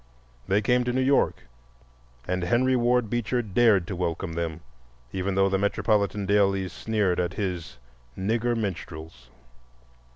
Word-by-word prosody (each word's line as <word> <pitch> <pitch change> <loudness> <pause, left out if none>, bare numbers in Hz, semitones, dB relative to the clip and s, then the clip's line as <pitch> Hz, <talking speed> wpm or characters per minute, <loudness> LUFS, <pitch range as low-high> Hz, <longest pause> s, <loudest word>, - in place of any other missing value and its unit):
They 105 +2 +2
came 125 +3 +3
to 125 - 0
New 130 +1 0
York 135 - +2 0.8
and 90 0 -1
Henry 125 +8 +2
Ward 125 -1 +2
Beecher 120 +2 -1
dared 105 -3 +3
to 95 - -5
welcome 85 -1 -3
them, 85 -1 -3 0.5
even 95 0 -2
though 95 0 +4
the 95 0 0
metropolitan 100 0 +1
dailies 95 -2 +2
sneered 105 -5 0
at 90 0 -1
his 90 - -4 0.4
"Nigger 115 +4 0
Minstrels." 80 - -6
100 Hz, 135 wpm, -26 LUFS, 90-115 Hz, 0.8 s, though